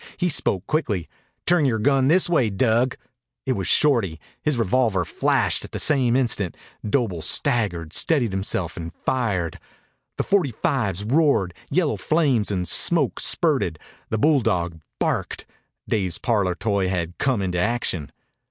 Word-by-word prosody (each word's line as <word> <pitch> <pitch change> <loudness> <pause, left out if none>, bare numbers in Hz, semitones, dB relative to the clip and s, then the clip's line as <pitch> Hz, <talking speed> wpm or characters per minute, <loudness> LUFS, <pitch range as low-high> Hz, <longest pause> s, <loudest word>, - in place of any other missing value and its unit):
He 180 -1 0
spoke 100 - +1
quickly. 105 - -1 0.4
"Turn 175 -2 +4
yore 120 -4 +1
gun 135 +3 +2
this 175 +5 +4
way, 145 -10 +2
Dug." 120 +4 +1 0.5
It 135 - 0
was 95 -6 -3
Shorty. 115 - +2 0.2
His 150 -4 0
revolver 110 -4 +1
flashed - - 0
at - - -11
the - - -2
same 130 -5 +2
instant. 110 - 0 0.3
Doble 105 - -1
staggered, 85 -3 0
steadied 135 -10 +2
himself, 95 -3 -2
and 85 -1 -6
fired. 100 -10 -1 0.6
The - - 0
forty 175 - +1
fives 100 -6 -1
roared. 125 - +2 0.2
Yellow 170 -5 +1
flames 140 -9 +1
and 90 -3 -2
smoke 150 - +3
spurted. 135 - +1 0.3
The 110 - -1
bulldog 90 - +1 0.2
barked. - - -2 0.4
Dave's 95 -6 0
parlor 100 -6 0
toy 100 -1 0
had 90 -2 -3
come 130 -7 +1
into 90 -1 -1
action. 105 -7 -1
110 Hz, 145 wpm, -23 LUFS, 95-135 Hz, 0.6 s, Turn